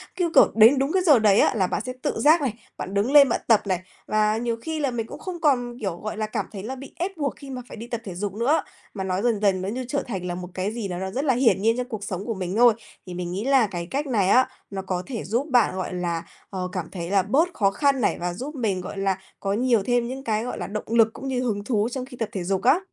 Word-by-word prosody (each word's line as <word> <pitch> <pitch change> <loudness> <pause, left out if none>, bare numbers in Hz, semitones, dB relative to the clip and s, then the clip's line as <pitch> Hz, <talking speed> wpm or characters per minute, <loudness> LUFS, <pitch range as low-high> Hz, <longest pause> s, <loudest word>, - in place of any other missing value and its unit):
Cứ, 350 -3 0
kiểu, - - +7
đến 225 +5 +7
đúng 275 +2 0
cái 375 +1 +2
giờ 295 -8 +6
đấy 210 -2 +5
là 190 -4 +2
bạn 195 - -2
sẽ 255 - -4
tự 290 - -2
giác 310 +3 +5
này, 260 -6 0 0.2
bạn 190 - -5
đứng 205 +6 +1
lên 285 -2 +8
bạn - - 0
tập 225 -3 +5
này, 185 -2 +1 0.3
và 215 0 +2
nhiều 235 0 -1
khi 320 -1 -3
là 280 -3 0
mình 230 -2 -3
cũng - - -9
không 360 -3 -6
còn, 245 -5 +1
kiểu, 190 -6 -3
gọi 215 +2 -5
là, 215 - -1
cảm 215 - -3
thấy 195 -3 -7
là 255 +5 -4
bị 270 +1 -11
ép 365 +2 -4
buộc 285 -3 -1
khi 280 -2 -11
mà 255 -1 -5
phải - - -10
đi 230 +2 -8
tập 235 -2 -4
thể 190 -5 -7
dục 195 +1 -3
nữa. 245 +9 +1 0.3
Mà 195 - -4
nó 185 +1 -1
dần 230 -3 +1
dần 195 -3 +2
nó 190 - -3
như 250 +3 -4
trở 280 +2 -1
thành 190 -6 -4
là 175 -1 -3
một 180 0 -7
cái 190 +3 -2
gì 225 -4 -3
đó 175 -1 -4
nó 190 +1 -4
rất 270 +7 -2
là 265 - +4
hiển 225 -6 +3
nhiên 225 +2 +2
trong 250 0 -2
cuộc 220 -4 -5
sống 195 -1 -4
của 230 - -2
mình 185 -1 -4
thôi. 240 -1 +7 0.3
Thì 180 - -6
mình 175 0 -4
nghĩ 195 +6 -3
là 270 -5 +4
cái 175 -3 -5
cách 285 +2 -1
này 205 -7 +2
á, 255 +4 +5 0.2
nó 195 -1 -4
có 185 -1 -3
thể 245 -5 -5
giúp 240 +8 -1
bạn, 240 -6 +4
gọi 185 -1 -3
là, 170 -2 -2 0.3
ờ, 185 -2 -3
cảm 180 -4 -4
thấy 170 -2 -5
là 195 -2 +4
bớt 300 - +2
khó 195 -2 +2
khăn 275 +2 +1
này - - +1
và 175 0 -2
giúp 275 - -6
mình, 210 -8 -1
gọi 190 +2 -7
là, 195 -1 0 0.2
có 195 0 -1
nhiều 235 -2 +2
thêm 245 0 +1
những 265 +2 -6
cái, 220 -2 0
gọi 250 - -4
là, - - -4
động 210 +1 -4
lực 225 -1 +3
cũng 270 - -7
như 255 -2 -1
hứng 210 -5 -1
thú 215 -1 0
trong 255 0 -4
khi 255 -1 -12
tập 225 -3 -2
thể 190 -6 -4
dục 190 +1 -1
á. 275 +8 +5
225 Hz, 300 wpm, -24 LUFS, 195-260 Hz, 0.3 s, lên